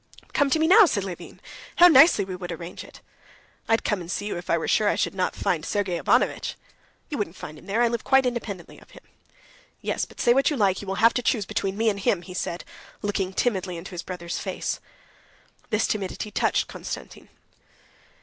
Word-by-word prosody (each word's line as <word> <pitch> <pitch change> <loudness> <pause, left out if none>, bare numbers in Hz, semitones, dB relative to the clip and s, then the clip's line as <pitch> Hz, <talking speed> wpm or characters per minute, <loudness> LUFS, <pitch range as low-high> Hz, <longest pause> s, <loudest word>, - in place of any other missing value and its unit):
"But - - -28
come 285 -1 +3
to 295 - +3
me 315 - +2
now," 405 +6 +8
said 200 - -1
Levin. 185 -3 -8 0.4
"How 355 - +9
nicely 275 - +7
we 185 -1 -5
would 180 -1 -6
arrange 170 +1 -7
it!" - - -15 0.7
"I'd 225 0 +3
come 210 -4 0
and 170 - -9
see 205 - -3
you 210 - -3
if 175 0 -8
I 170 - +3
were 160 - -3
sure 215 - +3
I - - +1
should - - -1
not 185 -1 -1
find 160 -3 -1
Sergey 190 -3 -1
Ivanovitch." - - +1 0.5
"You 295 - -4
wouldn't 195 -4 -3
find 155 - -8
him - - -17
there. 220 +4 +1
I - - +5
live 235 -1 -2
quite 265 0 +4
independently 220 -7 -4
of - - -20
him." - - -15 0.8
"Yes, - - -2
but - - -18
say 240 - +4
what 270 +2 +3
you 295 - -2
like, 195 -4 +2
you 200 - -9
will 195 - -2
have 230 - +6
to 250 - 0
choose 225 -4 +1
between 195 +1 -2
me 225 +1 +1
and 200 -2 +1
him," 190 -2 +1
he 180 - -9
said, 175 -1 -3 0.4
looking 195 -2 -1
timidly 190 -4 -1
into 170 +4 -9
his 175 -2 -5
brother's 175 -2 -5
face. - - -3 0.9
This 215 +1 +1
timidity 210 +1 -3
touched - - +1
Konstantin. - - -8
200 Hz, 215 wpm, -25 LUFS, 180-235 Hz, 0.9 s, How